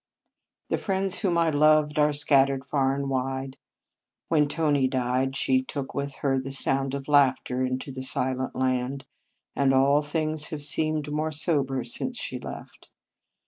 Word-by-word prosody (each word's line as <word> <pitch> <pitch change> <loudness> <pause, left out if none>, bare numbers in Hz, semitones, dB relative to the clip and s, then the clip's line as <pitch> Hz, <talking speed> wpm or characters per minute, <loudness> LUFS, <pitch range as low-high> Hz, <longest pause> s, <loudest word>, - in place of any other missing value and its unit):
The - - 0
friends 195 -1 -1
whom 180 -5 +1
I 165 -1 +3
loved 150 0 +4
are 150 0 +4
scat 145 -2 +3
tered 135 0 -4
far 135 -1 +1
and 140 0 -3
wide. 135 0 -2 0.7
When 150 -3 +3
Tony 145 -3 +1
died, 130 +1 0
she 130 -1 +2
took 135 +1 -6
with 140 -1 -3
her 135 -1 +2
the 135 +1 -5
sound 135 0 0
of 135 -1 -6
laugh 140 -3 +4
ter 125 +1 -2
into 130 +2 -3
the 130 0 -6
silent 130 0 -2
land, 130 +1 -1 0.5
and 135 -1 +3
all 140 +2 +4
things 155 0 -2
have 150 -2 -6
seemed 155 0 -1
more 155 +1 -1
sober 140 -4 -1
since 120 - -5
she - - -5
left. - - -10
140 Hz, 165 wpm, -26 LUFS, 130-150 Hz, 0.7 s, loved